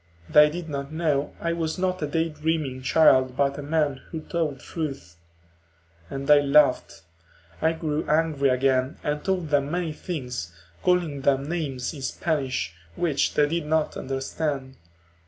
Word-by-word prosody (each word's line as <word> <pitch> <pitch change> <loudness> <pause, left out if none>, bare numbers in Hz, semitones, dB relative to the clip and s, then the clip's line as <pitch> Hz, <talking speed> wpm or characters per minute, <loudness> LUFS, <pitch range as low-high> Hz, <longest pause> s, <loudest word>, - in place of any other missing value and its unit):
They 150 - +7
did 170 +2 -6
not 140 -1 -5
know 155 -3 0
I 170 0 -1
was 165 0 -2
not 185 -1 -1
a 150 - 0
daydreaming 155 -3 -1
child 130 -3 +4
but 140 0 +1
a - - -3
man 145 -2 0
who 160 -2 -5
told 155 -4 -2
truth. 135 - -6 0.9
And 135 0 -5
they 145 0 +6
laughed; 140 - +3 0.6
I 160 +1 +3
grew 155 -2 -3
angry 155 -3 +2
again 130 +1 +1
and 150 0 -2
told 185 -5 -1
them 145 -1 +2
many 170 -1 -2
things, 125 - -5 0.3
calling 175 -6 +1
them 135 0 +2
names 145 -7 -3
in 145 - -9
Spanish, 135 - -2 0.2
which 155 -5 0
they 150 - +4
did 165 0 -2
not 160 0 +1
understand. 135 0 -3
150 Hz, 150 wpm, -25 LUFS, 135-160 Hz, 0.9 s, They